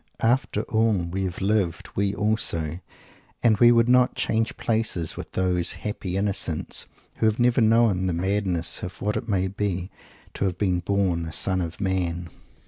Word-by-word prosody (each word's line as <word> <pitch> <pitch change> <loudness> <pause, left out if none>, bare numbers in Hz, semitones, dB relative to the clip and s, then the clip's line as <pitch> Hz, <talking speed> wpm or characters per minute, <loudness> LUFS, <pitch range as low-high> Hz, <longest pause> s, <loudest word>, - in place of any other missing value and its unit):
After 115 -2 +1
all, 110 -7 +1
"we 95 +1 -1
have 90 0 -5
lived"; 95 -4 0
we 100 0 0
also; 90 -7 -1 0.6
and 110 -3 +4
we 120 0 +7
would 115 0 +4
not 125 0 +4
"change 110 0 0
places" 110 -8 -1
with - - -8
those 90 -2 +1
"happy 95 -3 -4
innocents" 95 -5 -2 0.3
who 110 - +2
have 110 0 +1
never 125 +1 +3
known 110 -4 +3
the 90 - 0
madness 90 -1 -1
of 90 - -7
what 105 +1 0
it 120 - -3
may 95 -2 +1
be 95 -2 -3 0.4
to - - -2
have 90 -2 -1
been 95 -3 +1
born 90 -3 0
a - - -6
son 95 +4 0
of 85 +1 -5
man! 90 -3 -1
95 Hz, 170 wpm, -25 LUFS, 90-110 Hz, 0.6 s, we